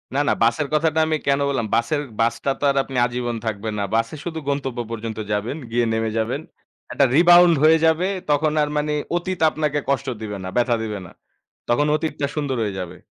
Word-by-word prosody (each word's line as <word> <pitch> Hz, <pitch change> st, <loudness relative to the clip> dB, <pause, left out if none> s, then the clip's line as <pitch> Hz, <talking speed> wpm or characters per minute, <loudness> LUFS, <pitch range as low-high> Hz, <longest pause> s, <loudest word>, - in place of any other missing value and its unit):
না, -, -, +2 dB
না -, -, +4 dB
বাসের 120 Hz, +6 st, +2 dB
কথাটা 160 Hz, +1 st, +2 dB
আমি 155 Hz, 0 st, +1 dB
কেন 140 Hz, 0 st, +3 dB
বললাম? 120 Hz, -5 st, -1 dB
বাসের 130 Hz, +6 st, 0 dB, 0.2 s
বাসটা 115 Hz, +4 st, 0 dB
তো -, -, -8 dB
আর -, -, -4 dB
আপনি 135 Hz, -, -6 dB
আজীবন 120 Hz, 0 st, -3 dB
থাকবেন 110 Hz, 0 st, -3 dB
না। 100 Hz, -, 0 dB
বাসে 115 Hz, +5 st, 0 dB
শুধু 165 Hz, -2 st, -4 dB
গন্তব্য 135 Hz, -3 st, -2 dB
পর্যন্ত 115 Hz, -1 st, -5 dB
যাবেন 105 Hz, +8 st, -2 dB
গিয়ে 120 Hz, 0 st, +2 dB
নেমে 110 Hz, 0 st, -1 dB
যাবেন। 120 Hz, +6 st, -1 dB, 0.5 s
একটা 140 Hz, -, +3 dB
রিবাউন্ড 175 Hz, 0 st, +7 dB
হয়ে 160 Hz, +1 st, +7 dB
যাবে 160 Hz, +3 st, +3 dB, 0.2 s
তখন 150 Hz, +1 st, +2 dB
আর 150 Hz, -, 0 dB
মানে 150 Hz, 0 st, 0 dB, 0.2 s
অতীত 185 Hz, +1 st, -4 dB
আপনাকে 150 Hz, -1 st, -1 dB
কষ্ট 140 Hz, -2 st, 0 dB
দিবে 105 Hz, -2 st, -5 dB
না, 95 Hz, -, -4 dB
ব্যথা 120 Hz, 0 st, +3 dB
দিবে 105 Hz, -2 st, -4 dB
না। -, -, -13 dB, 0.6 s
তখন 120 Hz, +5 st, +3 dB
অতীতটা 150 Hz, -2 st, -2 dB
সুন্দর 140 Hz, -4 st, -2 dB
হয়ে 100 Hz, -3 st, -3 dB
যাবে। 90 Hz, -2 st, -7 dB
135 Hz, 195 wpm, -22 LUFS, 115-155 Hz, 0.6 s, রিবাউন্ড